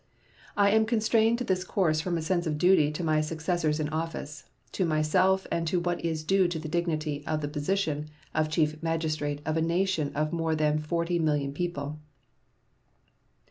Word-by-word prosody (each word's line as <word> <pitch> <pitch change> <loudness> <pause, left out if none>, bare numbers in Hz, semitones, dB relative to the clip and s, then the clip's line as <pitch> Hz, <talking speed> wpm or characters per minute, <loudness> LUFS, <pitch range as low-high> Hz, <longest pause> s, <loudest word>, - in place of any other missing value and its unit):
I 200 0 +5
am 220 +1 +3
constrained 225 0 +3
to 250 - -3
this 185 -5 0
course 165 -5 +1
from 175 +1 -1
a 160 - -3
sense 175 0 0
of 150 -1 -1
duty 155 -3 +4
to 155 +3 -4
my 155 -1 +2
successors 160 0 -1
in 155 - 0
office, 155 -2 -5 0.3
to 190 - -1
myself, 180 +4 +2
and 165 0 0
to 175 +2 +1
what 175 0 -2
is 160 -2 -2
due 190 +2 +3
to 175 -1 -3
the 155 0 -5
dignity 155 -3 -2
of 155 -1 -1
the 145 - -2
position 150 0 -1 0.2
of 155 0 +1
Chief 155 0 0
Magistrate 155 -3 -1
of 155 +1 0
a - - +1
nation 170 -2 0
of 155 +2 -1
more 165 -1 0
than 155 0 +1
40,000,000 155 -3 0
people. 150 -2 -4
160 Hz, 180 wpm, -28 LUFS, 155-180 Hz, 0.3 s, I